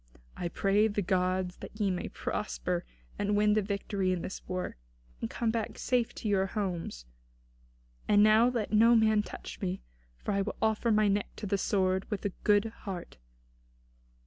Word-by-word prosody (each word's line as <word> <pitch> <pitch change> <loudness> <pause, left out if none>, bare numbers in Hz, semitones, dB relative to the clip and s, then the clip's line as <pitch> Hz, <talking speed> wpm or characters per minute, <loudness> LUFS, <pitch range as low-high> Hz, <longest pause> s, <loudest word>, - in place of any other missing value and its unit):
I 175 - -3
pray 195 +5 +2
the 205 -1 -1
gods 185 0 0
that 210 - -10
ye 200 -2 +2
may 180 - -2
prosper, - - -3 0.3
and 205 0 +1
win 210 0 +4
the 215 - +3
victory 200 -1 -1
in 180 -2 -1
this 190 - -5
war, 185 0 -3 0.5
and 115 - -2
come 230 -2 0
back 225 -2 -3
safe 245 -2 +1
to - - -4
your 195 -2 +2
homes. 180 - -3 1.0
And 205 0 +6
now 215 +3 +6
let 230 -4 -2
no 230 +2 +6
man 220 -1 +4
touch - - -9
me, 190 -1 -2 0.3
for - - -4
I 200 -1 +1
will 210 - -3
offer 220 +1 +1
my 215 -1 +4
neck 200 0 +1
to - - -6
the 200 - +1
sword 190 -1 +1
with 210 -3 -3
a 200 - 0
good 205 0 +4
heart." 185 -4 -7
205 Hz, 175 wpm, -30 LUFS, 185-215 Hz, 1.0 s, And